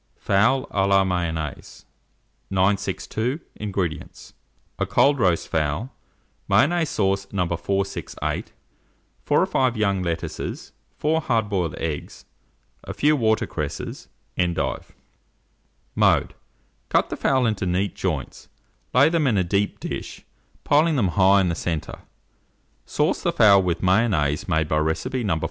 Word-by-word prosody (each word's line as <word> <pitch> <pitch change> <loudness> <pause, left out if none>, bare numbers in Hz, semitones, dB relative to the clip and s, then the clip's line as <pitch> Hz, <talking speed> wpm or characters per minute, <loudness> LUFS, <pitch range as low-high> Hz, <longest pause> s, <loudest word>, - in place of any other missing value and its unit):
FOWL 105 +7 +2
A 95 -1 +1
LA 100 0 +4
MAYONNAISE. 85 -5 -4 0.6
962. 100 - -1 0.2
INGREDIENTS. 95 -7 -4 0.5
A - - 0
cold 140 0 +3
roast 90 -6 +1
fowl, 80 - -1 0.6
Mayonnaise 150 - +3
sauce 95 -1 0
No. 95 -3 0
468, 95 +3 -3 0.7
4 - - +3
or - - +3
5 130 -3 0
young 100 -3 +1
lettuces, 85 -2 -4 0.3
4 160 +2 +1
hard 115 -7 0
boiled 90 -6 -1
eggs, 80 -3 -5 0.6
a - - -7
few 150 +1 +3
water 110 -5 +1
cresses, 75 -3 -5 0.3
endive. 85 -2 -1 1.0
Mode. - - +2 0.6
Cut - - +1
the - - -1
fowl 130 -2 +1
into 105 -4 -1
neat 90 +2 0
joints, - - -4 0.5
lay 140 +3 +7
them 160 -3 +1
in 115 -5 +2
a 95 - +3
deep 100 +3 -1
dish, - - -6 0.4
piling 155 +2 +3
them 105 -9 +2
high 95 +2 +4
in 90 - +1
the - - 0
centre, 80 -2 -4 0.9
sauce - - 0
the - - +1
fowl 100 -3 +6
with 90 -1 -2
Mayonnaise 90 -7 +2
made 80 -1 +1
by 75 0 +1
recipe 80 +11 -1
No. 95 -7 0
100 Hz, 130 wpm, -23 LUFS, 85-115 Hz, 1.0 s, lay